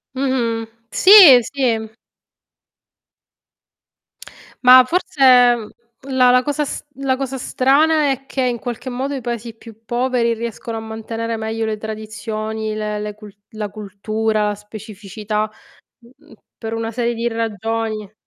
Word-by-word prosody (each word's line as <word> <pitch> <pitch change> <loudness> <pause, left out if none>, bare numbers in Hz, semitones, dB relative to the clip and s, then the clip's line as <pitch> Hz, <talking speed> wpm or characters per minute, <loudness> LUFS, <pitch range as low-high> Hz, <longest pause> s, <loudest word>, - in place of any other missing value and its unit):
Mh-mh. 240 -4 -1 0.2
Sì, 370 -10 +9
sì. 225 -4 -1 2.7
Ma 255 +1 +9
forse, 345 -1 -3
ehm, 245 -4 +5 0.4
la 255 -2 +4
la 250 0 +4
cosa 295 +2 -1
s - - -6
la 270 -1 -1
cosa 270 0 -4
strana 285 +4 +2
è 270 0 -5
che 270 - -4
in 245 -2 -1
qualche 245 +2 -6
modo 265 +3 -3
i 265 - -5
Paesi 235 -1 -5
più 225 -1 -16
poveri 240 -1 0
riescono 230 0 -6
a - - -5
mantenere 225 +1 -5
meglio 220 +1 -3
le 215 -1 -3
tradizioni, 220 0 -5
le 210 -1 -3
le 210 0 -5
cul 210 -2 -13 0.2
la 215 -2 -5
cultura, 215 +1 -2
la 205 - -3
specificità, 210 0 -5 0.5
mhmm, 265 +6 -22 0.2
per 225 -1 -7
una 225 0 -3
serie 235 +1 -2
di 235 +1 -1
ragioni. 225 -1 -3
230 Hz, 135 wpm, -19 LUFS, 215-255 Hz, 2.7 s, Sì